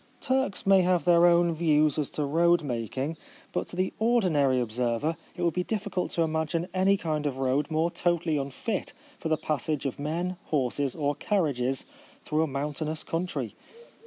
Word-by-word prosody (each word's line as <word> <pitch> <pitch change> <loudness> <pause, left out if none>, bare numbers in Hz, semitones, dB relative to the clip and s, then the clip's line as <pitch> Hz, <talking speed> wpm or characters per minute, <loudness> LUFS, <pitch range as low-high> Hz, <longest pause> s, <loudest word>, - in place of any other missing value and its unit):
Turks 260 -7 0
may 195 -1 +6
have 180 -3 +2
their 175 0 +6
own 170 0 +4
views 155 -2 +2
as 145 - -1
to 150 - +1
road 170 +3 +3
making, 130 +4 -3 0.4
but - - -1
to - - -9
the 185 +1 0
ordinary 175 - +3
observer 120 +6 -1 0.2
it 175 - -2
would 170 -2 +2
be 180 - 0
difficult 200 -3 -2
to 170 - +2
imagine 160 +2 -1
any 190 +1 +3
kind 155 -4 -1
of 135 -2 -3
road 135 +3 +1
more 160 +2 +1
totally 170 -3 0
unfit 145 - -3 0.3
for 160 - -3
the 155 - +2
pas 150 -2 -2
sage 150 -2 -1
of 135 - -3
men, 170 +5 -2
horses, 140 -1 0
or 145 -2 0
carriages, 140 - 0 0.4
through 155 +1 +1
a 160 - +2
mountainous 150 +3 -3
country. 175 +2 -3
160 Hz, 175 wpm, -28 LUFS, 145-175 Hz, 0.4 s, may